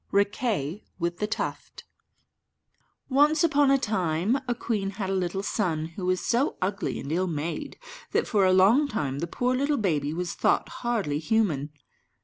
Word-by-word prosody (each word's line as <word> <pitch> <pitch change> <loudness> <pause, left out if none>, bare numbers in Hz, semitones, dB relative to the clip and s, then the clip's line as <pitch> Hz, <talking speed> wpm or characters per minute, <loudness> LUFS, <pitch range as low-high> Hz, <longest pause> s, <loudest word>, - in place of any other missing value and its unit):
RIQUET 200 - 0 0.2
WITH 170 0 -2
THE 210 - 0
TUFT 220 - -4 1.2
Once 295 +4 +4
upon 290 -4 +4
a 275 - +5
time 200 - 0
a 240 - 0
queen 210 -4 -2
had 195 -2 -2
a - - 0
little 190 +1 -1
son, 165 -7 -1
who 180 +2 -5
was 185 -1 0
so 250 +6 +1
ugly 195 +2 -2
and 140 - -6
ill 185 +3 +1
made, 160 -1 -4 0.3
that - - +1
for 205 -3 +2
a 185 - +5
long 205 +11 +5
time 145 - -2
the 170 - -2
poor 250 +8 0
little 280 +3 +1
baby 150 -9 0
was 175 +2 -3
thought - - +1
hardly 215 -12 0
human. 160 -6 +1
195 Hz, 165 wpm, -26 LUFS, 170-235 Hz, 1.2 s, a